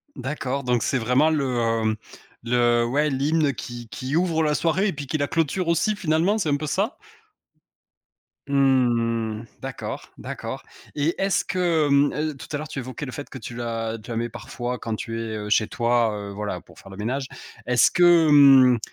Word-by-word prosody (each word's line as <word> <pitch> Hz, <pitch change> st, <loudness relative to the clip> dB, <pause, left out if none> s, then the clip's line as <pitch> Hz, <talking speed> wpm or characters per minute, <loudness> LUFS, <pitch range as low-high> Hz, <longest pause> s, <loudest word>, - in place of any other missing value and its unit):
D'accord, 140 Hz, 0 st, -3 dB
donc 125 Hz, -2 st, +1 dB
c'est 135 Hz, -, +1 dB
vraiment 125 Hz, +6 st, +3 dB
le, 120 Hz, -7 st, 0 dB
mmh 110 Hz, 0 st, +1 dB, 0.5 s
le 120 Hz, 0 st, +2 dB
ouais 145 Hz, +5 st, +1 dB
l'hymne 145 Hz, +2 st, +1 dB
qui 120 Hz, 0 st, -8 dB
qui 130 Hz, +4 st, -4 dB
ouvre 165 Hz, -2 st, +2 dB
la 150 Hz, -1 st, +1 dB
soirée 170 Hz, +5 st, +1 dB
et 195 Hz, -, -1 dB
puis 145 Hz, -2 st, -7 dB
qui 155 Hz, -, -1 dB
la 145 Hz, -1 st, 0 dB
clôture 165 Hz, +3 st, 0 dB
aussi 170 Hz, +6 st, +2 dB
finalement, 170 Hz, +4 st, +1 dB
c'est 190 Hz, -8 st, -1 dB
un 145 Hz, -, +3 dB
peu 155 Hz, +1 st, -4 dB
ça? 200 Hz, -, -1 dB, 1.5 s
Mmh 120 Hz, -5 st, +1 dB
mh -, -, -12 dB, 0.2 s
d'accord, -, -, -5 dB, 0.2 s
d'accord -, -, -6 dB, 0.3 s
et 150 Hz, +3 st, +1 dB
est-ce 195 Hz, 0 st, +2 dB
que 170 Hz, -5 st, +1 dB
mmh, 140 Hz, +1 st, +3 dB
heu, 155 Hz, 0 st, -2 dB
tout -, -, -10 dB
à 145 Hz, -, -1 dB
l'heure 155 Hz, +1 st, -6 dB
tu 150 Hz, -, -5 dB
évoquais 130 Hz, +3 st, -6 dB
le 130 Hz, -, -7 dB
fait 145 Hz, -, -7 dB
que -, -, -8 dB
tu 120 Hz, -1 st, -8 dB
la 115 Hz, -1 st, -3 dB
tu 105 Hz, -, -14 dB
la 115 Hz, -, -2 dB
mets 120 Hz, +1 st, -2 dB
parfois 120 Hz, +1 st, -5 dB
quand 115 Hz, -1 st, -3 dB
tu 115 Hz, +1 st, -5 dB
es, 110 Hz, -1 st, -4 dB
heu, 105 Hz, 0 st, -5 dB
chez 110 Hz, +1 st, +3 dB
toi, 120 Hz, -1 st, +1 dB
heu, 100 Hz, -1 st, -6 dB
voilà, 105 Hz, +1 st, -4 dB
pour -, -, -18 dB
faire 95 Hz, -, -14 dB
le 95 Hz, -, -10 dB
ménage. 130 Hz, +6 st, -2 dB, 0.4 s
Est-ce 125 Hz, -2 st, +4 dB
que 175 Hz, -2 st, +5 dB
mmh, 135 Hz, -4 st, +7 dB
130 Hz, 200 wpm, -24 LUFS, 120-155 Hz, 1.5 s, mmh